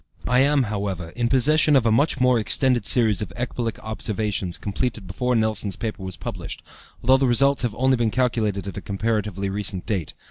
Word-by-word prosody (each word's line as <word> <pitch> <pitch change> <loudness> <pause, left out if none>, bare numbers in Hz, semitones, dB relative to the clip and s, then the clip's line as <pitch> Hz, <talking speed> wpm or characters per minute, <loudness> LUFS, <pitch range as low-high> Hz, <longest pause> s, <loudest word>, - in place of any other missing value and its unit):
I 125 +1 +3
am, 140 0 +3
however, 100 -6 -3
in 120 +6 -2
possession 150 +4 +4
of 130 -4 +3
a 115 - +3
much 140 +4 +2
more 125 -2 +4
extended 120 0 +1
series 110 -6 +3
of 100 -5 -4
ecbolic 120 -2 -3
observations 105 -4 -3
completed 110 +1 -3
before 125 +7 -1
Nelson's 110 -3 0
paper 110 -3 -5
was 95 -2 -6
published, - - -6 0.4
although 130 +2 +5
the 135 0 +1
results 140 +3 +3
have 120 -4 -2
only 130 +2 +2
been 115 -1 +1
calculated 110 -5 0
at 100 -4 -6
a - - -4
comparatively 105 -1 -2
recent 95 -2 -2
date. 95 -7 -3
110 Hz, 185 wpm, -23 LUFS, 100-125 Hz, 0.4 s, although